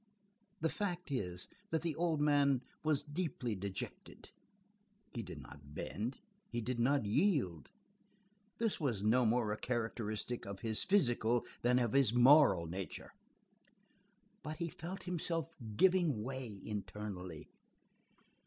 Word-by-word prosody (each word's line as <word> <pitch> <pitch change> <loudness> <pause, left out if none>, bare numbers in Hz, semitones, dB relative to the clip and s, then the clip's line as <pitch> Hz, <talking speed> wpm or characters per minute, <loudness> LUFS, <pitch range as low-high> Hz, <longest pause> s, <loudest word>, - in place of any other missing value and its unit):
The 160 - +2
fact 180 -5 -3
is, 90 -9 -2 0.2
that 160 -1 0
the 165 -3 -1
old 165 -2 +1
man 140 -3 +4 0.2
was 155 -2 +1
deeply 145 -6 -2
dejected. 100 -1 -6 0.8
He 120 - -3
did 90 -7 -8
not 70 +1 -12
bend, 115 - -3 0.3
he 120 - -2
did 120 +1 -2
not 135 0 +3
yield; 105 - +1 0.9
this 225 -2 0
was 120 - -1
no 115 +3 +4
more 110 -1 +2
a 105 - -1
characteristic 115 -1 -2
of 100 -1 -6
his 110 -2 0
physical 120 - +3 0.2
than 125 +1 +4
of 120 -3 +1
his 130 -4 +4
moral 130 - +7
nature, 90 +3 -6 1.3
but 155 +1 -5
he 170 +1 -2
felt 175 +5 -7
himself 165 -3 -2 0.2
giving 175 - +4
way 125 -5 -5
internally. 100 -5 -5
125 Hz, 125 wpm, -36 LUFS, 105-155 Hz, 1.3 s, moral